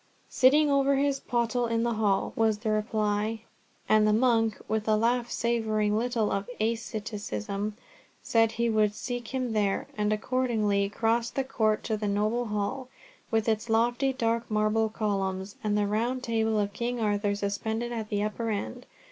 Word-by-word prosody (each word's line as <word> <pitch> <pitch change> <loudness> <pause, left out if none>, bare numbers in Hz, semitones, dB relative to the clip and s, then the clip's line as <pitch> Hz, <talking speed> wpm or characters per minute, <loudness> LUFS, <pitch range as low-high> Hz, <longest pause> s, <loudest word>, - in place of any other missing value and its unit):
"Sitting 290 +3 +5
over 275 0 +3
his 275 0 +1
pottle 240 -1 0
in 230 0 0
the 235 0 +1
Hall," 210 -3 +1
was 225 -3 +2
the 220 0 -2
reply, 215 0 0 0.5
and 215 0 +4
the 210 - +3
monk, 225 -2 +2
with 220 0 -1
a 215 - +4
laugh 235 +2 +1
savouring 220 -3 0
little 230 -1 0
of 195 +3 -2
asceticism, 210 - -3 0.5
said 225 -1 +2
he 235 +1 0
would 215 -2 +2
seek 245 0 -4
him 255 -3 -2
there, 205 -2 0
and 210 0 0
accordingly 215 -3 +1
crossed 230 +2 0
the 270 - +1
court 220 -5 0
to 220 - -1
the 210 0 -2
noble 215 +4 0
Hall, 210 +5 -3 0.4
with 225 -1 0
its 220 +1 0
lofty 240 +4 +2
dark 230 -2 -1
marble 215 +1 +1
columns, 195 -3 -2
and 210 -1 +1
the 205 - +2
Round 235 +5 -1
Table 225 -2 +1
of 205 -1 0
King 240 +2 -2
Arthur 205 -1 0
suspended 220 +4 -2
at 220 -2 -4
the 205 0 0
upper 220 +2 -2
end. 200 - -4
220 Hz, 165 wpm, -28 LUFS, 210-235 Hz, 0.5 s, Sitting